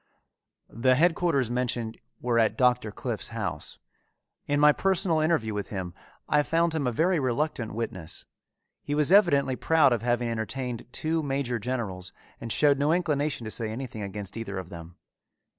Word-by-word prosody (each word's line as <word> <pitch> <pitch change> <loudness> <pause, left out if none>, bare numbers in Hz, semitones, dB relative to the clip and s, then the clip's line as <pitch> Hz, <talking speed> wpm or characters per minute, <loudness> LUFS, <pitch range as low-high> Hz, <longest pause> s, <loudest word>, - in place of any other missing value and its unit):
The 130 +3 +2
headquarters 165 -5 +2
mentioned 120 -2 -2 0.2
were 120 -1 +1
at 110 -1 +2
Doctor 125 -4 +2
Cliffe's - - -3
house. - - -5 0.7
In 145 0 +1
my 150 0 +7
personal 180 -1 +1
interview 155 -9 +1
with 105 -1 -4
him, 95 -4 -5 0.3
I 150 - +3
found 165 +2 +1
him 150 -5 -1
a - - +1
very 170 +8 +2
reluctant 130 -4 -1
witness. 95 -8 -5 0.6
He 145 - -3
was 150 +2 +2
evidently 145 -10 +4
proud 160 -2 +4
of 115 - -1
having 120 0 0
entertained 115 +2 -4
two 160 +4 -1
major 135 -4 -2
generals 105 -6 -4 0.3
and 115 - -5
showed 145 +1 +3
no 145 +2 +2
inclination 150 -7 0
to 110 - -4
say 110 -1 -1
anything 115 -1 -6
against 100 +1 -5
either 100 -4 -5
of 95 -2 -6
them. 85 0 -10
125 Hz, 160 wpm, -27 LUFS, 110-150 Hz, 0.7 s, my